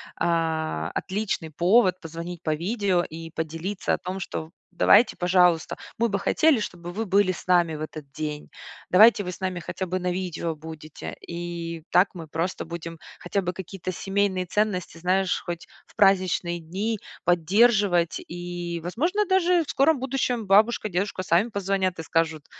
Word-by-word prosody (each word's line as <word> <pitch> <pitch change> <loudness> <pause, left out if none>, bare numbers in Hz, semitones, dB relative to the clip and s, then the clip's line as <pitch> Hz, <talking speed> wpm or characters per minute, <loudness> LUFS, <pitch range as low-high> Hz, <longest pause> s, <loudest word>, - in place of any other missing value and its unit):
а, 160 - -1
отличный 190 -4 -3
повод 185 +4 +3
позвонить 165 +1 -7
по 155 - +1
видео 190 0 0
и 165 0 -8
поделиться 165 +5 -3
о - - +1
том, 185 +1 -5
что: 160 -3 -5 0.2
"Давайте, 215 +6 +5
пожалуйста, 180 -2 +3 0.2
мы 235 0 +2
бы 200 0 -1
хотели, 305 +5 +3
чтобы 175 -3 -6
вы 220 +2 -2
были 195 0 +3
с 185 - -9
нами 175 -3 +3
в 150 - -7
этот 155 -2 -7
день. 150 0 -5 0.4
Давайте 210 +2 +7
вы 180 - -4
с - - -10
нами 185 -2 -2
хотя 190 +2 -4
бы 185 +1 -1
на 180 0 -1
видео 175 -3 -3
будете". 155 0 -9
И 170 -1 -5
так 180 +3 +5
мы 165 -4 -8
просто 165 +4 -2
будем 165 0 -7 0.2
хотя 195 +3 -1
бы 180 - -2
какие-то 185 0 -6
семейные 195 -1 0
ценности, 190 -3 -1
знаешь, 185 +2 +1
хоть 175 -1 -5 0.2
в - - -23
праздничные 185 -3 +2
дни 200 +7 -3 0.2
поддерживать. 180 0 +3
И, 175 0 -5
возможно, 335 - 0
даже 360 -2 +3
в 300 - -14
скором 280 0 +3
будущем 250 -4 -1
бабушка, 215 +3 +4
дедушка 185 0 -2
сами 185 +6 +2
позвонят 195 -3 -1
и - - -4
скажут: 160 -2 0
180 Hz, 160 wpm, -25 LUFS, 170-200 Hz, 0.4 s, Давайте